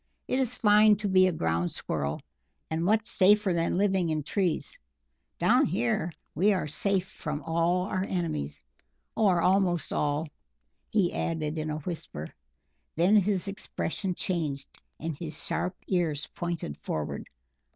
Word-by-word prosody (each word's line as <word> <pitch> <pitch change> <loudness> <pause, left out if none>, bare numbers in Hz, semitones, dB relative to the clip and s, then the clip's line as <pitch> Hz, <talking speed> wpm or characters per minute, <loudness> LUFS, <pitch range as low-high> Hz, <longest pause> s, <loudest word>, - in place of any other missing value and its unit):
It 255 - +1
is 250 -2 +1
fine 210 0 +6
to 205 +1 -3
be 185 -1 +5
a - - +2
ground 85 - 0
Squirrel, 70 +1 -3 0.5
and 160 +1 0
much 215 +4 +3
safer 205 -1 +4
than 170 +1 +1
living 190 -3 +2
in 155 -1 -1
trees. 180 +1 -1 0.6
Down - - +4
here 120 +9 0 0.2
we 200 +7 +3
are 185 - -1
safe 190 +5 0
from 150 -3 -5
all 170 +2 +1
our 185 -1 -1
enemies 75 - -2 0.5
or 190 -6 +3
almost 180 -3 +2
all," 150 +2 0 0.6
he 200 -6 +2
added 160 -1 -2
in 155 0 -2
a 150 - -2
whisper. 145 - -5 0.7
Then 180 +6 +4
his 200 -1 +2
expression 195 -1 -3
changed, 150 -8 -2 0.3
and 160 0 -3
his 155 0 -6
sharp 185 +1 -1
ears 165 -6 0
pointed 170 - -4
forward. 75 -1 -4
175 Hz, 140 wpm, -28 LUFS, 155-195 Hz, 0.7 s, fine